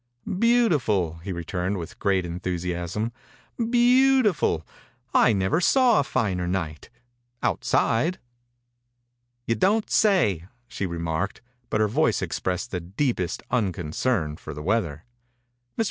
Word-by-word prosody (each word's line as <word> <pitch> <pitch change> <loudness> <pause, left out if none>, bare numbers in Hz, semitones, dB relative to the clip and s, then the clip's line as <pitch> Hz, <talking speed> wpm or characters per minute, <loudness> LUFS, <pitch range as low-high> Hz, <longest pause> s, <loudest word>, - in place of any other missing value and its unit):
« - - -43
Beautiful," 150 - +2
he 90 +4 -6
returned 90 +2 -3
with 85 -3 -8
great 95 -3 +1
enthusiasm. 90 +4 -3 0.3
« 230 -1 -5
Beautiful 245 - +3 0.5
I - - +5
I - - +3
never 95 - +1
saw 250 +3 +4
a - - +2
finer 95 -9 -1
night 80 -4 -3 0.3
— 120 0 -33
out - - 0
side." 140 +11 +1 1.3
"You 115 - +1
don't 205 - +2
sayl" 105 - +2 0.2
she 100 - -3
re 85 -1 -5
marked, 85 +4 -2 0.3
but 105 - +1
her 105 - +3
voice 105 - +1
expressed 95 +5 -3
the 90 - -2
deepest 95 - -2
unconcern 90 -4 -1
for 80 - -8
the 75 - -7
weather. 85 -6 -1 0.7
Mr. - - -9
100 Hz, 135 wpm, -25 LUFS, 85-140 Hz, 1.3 s, I